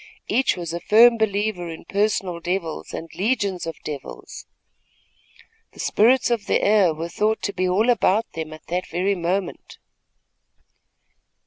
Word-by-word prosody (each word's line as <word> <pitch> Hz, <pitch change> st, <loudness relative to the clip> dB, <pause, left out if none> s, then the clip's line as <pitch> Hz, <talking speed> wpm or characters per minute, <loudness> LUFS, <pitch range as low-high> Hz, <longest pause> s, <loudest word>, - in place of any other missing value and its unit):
Each 265 Hz, -5 st, +1 dB
was 170 Hz, -2 st, -5 dB
a 170 Hz, -, -3 dB
firm 230 Hz, +6 st, +6 dB
believer 205 Hz, -4 st, -1 dB
in 160 Hz, -, -9 dB
personal 195 Hz, -4 st, -1 dB
devils 175 Hz, -2 st, -3 dB
and 165 Hz, -, -6 dB
legions 195 Hz, -2 st, -1 dB
of 165 Hz, -, -5 dB
devils. 145 Hz, -3 st, -8 dB, 1.3 s
The -, -, -17 dB
spirits 245 Hz, +3 st, +3 dB
of 230 Hz, -3 st, -1 dB
the -, -, +2 dB
air 205 Hz, -4 st, +4 dB
were 160 Hz, +2 st, -5 dB
thought 215 Hz, +5 st, -1 dB
to 200 Hz, -, -2 dB
be 185 Hz, -1 st, 0 dB
all 205 Hz, +6 st, +2 dB
about 220 Hz, -2 st, +2 dB
them, 160 Hz, -1 st, -4 dB
even 155 Hz, -, -10 dB
at 155 Hz, -, -13 dB
that 180 Hz, +2 st, -3 dB
very 185 Hz, +4 st, 0 dB
moment. 180 Hz, +1 st, -3 dB
190 Hz, 150 wpm, -22 LUFS, 170-215 Hz, 1.3 s, firm